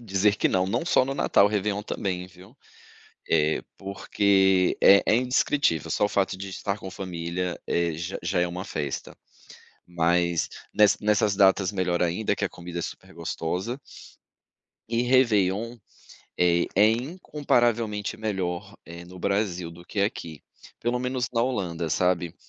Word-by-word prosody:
dizer 100 -2 +1
que - - +2
não 95 0 +1
não 115 +9 -1
só 130 - +4
no 135 - -3
Natal, 100 - +4
Réveillon 105 0 -1
também, 90 -3 -3
viu? 95 +7 -17 0.7
Eh, 80 -1 +2 0.2
porque 95 -1 +2
é 100 0 +7
é 110 - +4
indescritível, 125 - +1
só 105 - +1
o - - +2
fato 95 -2 0
de 100 +1 -7
estar 100 +1 -3
com 95 - -8
família, 90 -1 -4
eh, 85 -1 0
já 85 +4 -5
já 90 +2 0
é 90 - +2
uma 90 +2 -5
festa, 75 -7 -5 0.7
mas 85 0 +1 0.2
nes 105 -1 +5
nessas 105 -1 +2
datas 95 -1 +4
melhor 90 -3 -1
ainda 90 +4 0
que 100 - -1
a - - -2
comida 85 0 -7
é - - -2
super - - -8
gostosa. 90 - -3 1.1
E 115 +1 0
Réveillon, 115 -3 +2 0.6
eh, 85 -1 +3
é 105 +3 +6
incomparavelmente 120 - 0
melhor, 95 -2 -3
eh, 85 +1 -10
no 90 +1 -12
Brasil 100 -3 -1
do 85 +1 -14
que 100 - -2
aqui 85 - -3 0.4
pelo 120 +1 0
menos 125 0 -2
na 115 - +2
Holanda, 90 -10 -2
sabe, 90 0 +1
95 Hz, 150 wpm, -26 LUFS, 90-105 Hz, 1.1 s, é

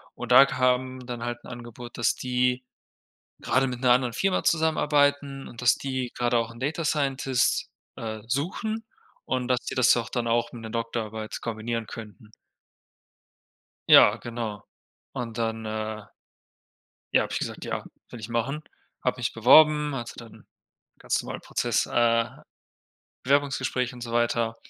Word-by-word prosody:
und - - -6
da 130 +2 +9
kam 130 -1 0
dann 120 -1 -6
halt 120 0 -5
'n - - -11
Angebot, 120 0 -9
dass 115 -2 +2
die 125 0 0 0.8
gerade 135 - +1
mit 125 -2 -4
'ner 125 -1 +5
anderen 125 -1 +2
Firma 195 +6 0
zusammenarbeiten 145 -3 +2
und 120 +1 -10
dass 120 - +5
die 130 -2 -3
gerade 120 0 +1
auch 115 -1 0
'n 115 - -13
Data 155 +4 -2
Scientist, 135 -4 +1 0.3
äh, 110 -1 -5
suchen 185 - -2 0.4
und 130 -1 -2
dass 125 -1 +2
die - - -4
das 130 -1 +5
auch 120 0 -2
dann 120 -1 -2
auch 120 +1 +1
mit 120 - -8
'ner 110 - -7
Doktorarbeit 110 -1 -4
kombinieren 115 0 -3
könnten. 105 -1 -10 1.6
Ja, - - +8
genau. 115 -4 -5 0.5
Und 115 -2 -5
dann, 115 -1 -2
äh 110 0 -4 1.1
ja, - - +5
habe - - -5
ich - - 0
gesagt: - - -5
„Ja, - - -3 0.3
will 120 - -9
ich 110 - -7
machen.“ 120 +6 -2 0.4
Habe 125 - 0
mich 120 - -1
beworben, 150 +5 +6
also 120 -3 -5
dann 115 -2 -12 0.5
ganz - - -1
normalen - - -6
Prozess, - - 0
äh 115 -1 +2 1.0
Bewerbungsgespräche 130 -2 0
und 120 - -11
so 115 -1 -6
weiter. 115 -1 +1
120 Hz, 155 wpm, -26 LUFS, 115-130 Hz, 1.6 s, da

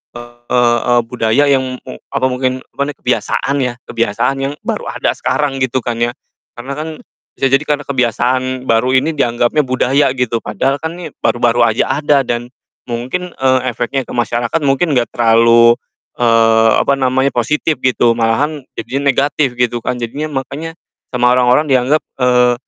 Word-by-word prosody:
eee, 120 0 0
budaya 115 +3 +1
yang 130 -1 0
mu 65 - -9
apa 130 - -1
mungkin, 130 0 -2
apa 140 - -6
nih 145 - -5
kebiasaan 130 +2 0
ya, 125 -2 -1
kebiasaan 115 +3 -1
yang 135 +1 -2
baru - - -3
ada - - -1
sekarang 140 -3 -1
gitu 130 -1 -1
kan 115 -1 -3
ya. 120 0 +1 0.4
Karena 125 +3 -7
kan 155 - -4 0.5
bisa 135 - +1
jadi 135 +2 +3
karena 145 -1 0
kebiasaan 130 0 0
baru 125 +2 +1
ini 145 +5 +2
dianggapnya 120 +3 +1
budaya 130 +2 +1
gitu, 120 -2 -1
padahal 130 +7 -1
kan 160 +1 -3
ini 175 - -7
baru-baru 120 0 +2
aja 115 +5 0
ada 145 -2 +2
dan 120 0 -3 0.4
mungkin, 130 +10 -4
eee, 130 -1 +2
efeknya 125 +3 -2
ke - - -9
masyarakat 120 +5 -1
mungkin 140 +4 +1
nggak 120 -1 -1
terlalu, 115 0 +5 0.4
eee, 115 -1 +4
apa - - +2
namanya, 130 +1 +1
positif 150 +4 -1
gitu, 120 -2 +2
malahan 140 +6 0
jadinya 140 +1 0
negatif 140 -1 0
gitu 120 -1 0
kan. 125 - -3
Jadinya 140 +6 -4 0.2
makanya 160 +5 -7 0.4
sama 125 -1 +2
orang-orang 125 +4 +3
dianggap, 130 +4 +2 0.2
eee, 125 -1 +3
125 Hz, 160 wpm, -15 LUFS, 120-135 Hz, 0.5 s, terlalu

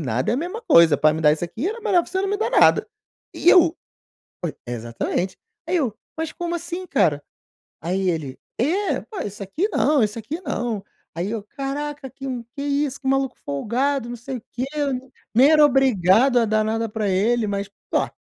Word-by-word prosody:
nada 125 - -1
é - - +2
a - - -1
mesma 365 - -4
coisa, 165 - +6
pra 155 +2 +4
me 160 - -3
dar 150 -1 +5
isso 160 +3 -2
aqui 225 - -4
era 455 +3 -5
melhor 385 -6 +3
pra - - -12
você 380 - 0
não 395 - -1
me 410 - 0
dar 440 - -1
nada", - - +5 0.5
e 350 - +1
eu: 345 -3 +6 0.7
"Oi" 170 - -3
exatamente. 120 +10 -3 0.3
Aí 360 +1 +1
eu: 245 -9 -1 0.2
"Mas 320 -1 -3
como 345 0 -4
assim, 345 +2 -5
cara?", 150 - +1 0.6
aí 185 +4 -1
ele: 145 -6 -4 0.2
"É, 370 +10 +1 0.2
oi, 370 - -3
isso 205 0 -7
aqui 310 - -1
não, 290 - +3
isso 210 +1 -1
aqui 290 +10 -5
não", 235 - -3 0.3
aí 175 +5 -2
eu: 225 -3 -3
"Caraca, 280 +3 -5
que 270 +1 -9
um 250 -3 -3
que 280 - -4
isso, 285 -1 -1
que 265 - -9
maluco 270 -1 +1
folgado, 240 - -1
não 240 - -5
sei 255 +3 -6
o - - -15
quê. 250 +2 -2
N 265 -3 -2 0.2
nem 265 +6 +6
era 305 -1 +7
obrigado 250 -2 +4
a 230 - +3
dar 215 0 +2
nada 225 +1 -1
pra 210 -1 -2
ele. 215 +5 +2
Mas 200 0 -3 0.2
ó, - - +2
245 Hz, 205 wpm, -22 LUFS, 195-295 Hz, 0.7 s, era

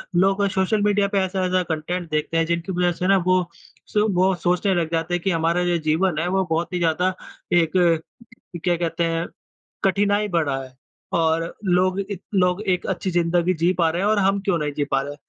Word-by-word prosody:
लोग 195 +3 +3
social 190 +3 +1
media 205 -1 +2
पे 200 -1 0
ऐसा-ऐसा 185 -1 0
content 165 +2 -3
देखते 155 +2 -1
हैं, 165 - +2
जिनकी 170 +3 -2
वजह 180 0 +1
से 180 +2 -3
ना 195 0 +5
वो 185 0 +4 0.5
स - - -1 0.2
वो 185 +2 +3
सोचने 180 +2 +2
लग 165 -2 -1
जाते 165 +1 -1
हैं 175 - 0
कि 195 - +1
हमारा 165 +2 +1
जो 175 -1 +1
जीवन 165 +1 +1
है 170 - -1
वो 190 +1 +1
बहुत 165 +2 -1
ही - - 0
ज़्यादा 175 +3 +1 0.4
एक, 165 -2 +3 0.9
क्या 175 -1 +2
कहते 170 0 -2
हैं, 165 0 -1 0.6
कठिनाई 205 +2 +2
बढ़ा 145 -6 0
है। 130 0 -13 0.4
और 165 0 +1
लोग 185 +1 +2
इत 195 -3 -5
लोग 180 +1 +2
एक 185 -4 -1
अच्छी 190 0 -2
ज़िंदगी 175 +1 +1
जी 170 +2 +1
पा 165 - +4
रहे 170 +3 -2
हैं 200 - +1
और 215 -1 +2
हम 195 +1 +2
क्यों 195 -3 0
नहीं 150 -1 -2
जी 145 - +1
पा 135 - +2
रहे? 145 +1 -6
175 Hz, 210 wpm, -22 LUFS, 165-190 Hz, 0.9 s, ना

